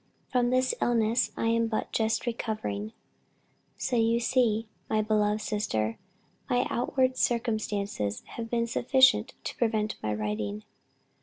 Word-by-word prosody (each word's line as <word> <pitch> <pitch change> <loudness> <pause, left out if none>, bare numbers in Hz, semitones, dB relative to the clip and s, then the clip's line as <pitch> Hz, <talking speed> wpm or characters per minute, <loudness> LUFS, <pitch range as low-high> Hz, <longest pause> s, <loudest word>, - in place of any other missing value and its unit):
From 245 -2 +2
this 255 +1 +2
illness 230 0 +2
I 225 - +1
am 230 0 +2
but 220 -1 -2
just 220 0 0
recovering. 160 - -3 0.9
So 245 - -1
you 230 +1 +3
see, 230 -3 +2 0.2
my 215 0 +2
beloved 210 0 +1
sister, 115 - -1 0.5
my 245 0 +2
outward 255 +1 +1
circumstances 210 - -1
have 230 -1 -6
been 235 0 +1
sufficient 255 +2 +3
to - - -5
prevent 220 -2 0
my 105 - -1
writing. 105 0 -3
225 Hz, 130 wpm, -28 LUFS, 210-240 Hz, 0.9 s, you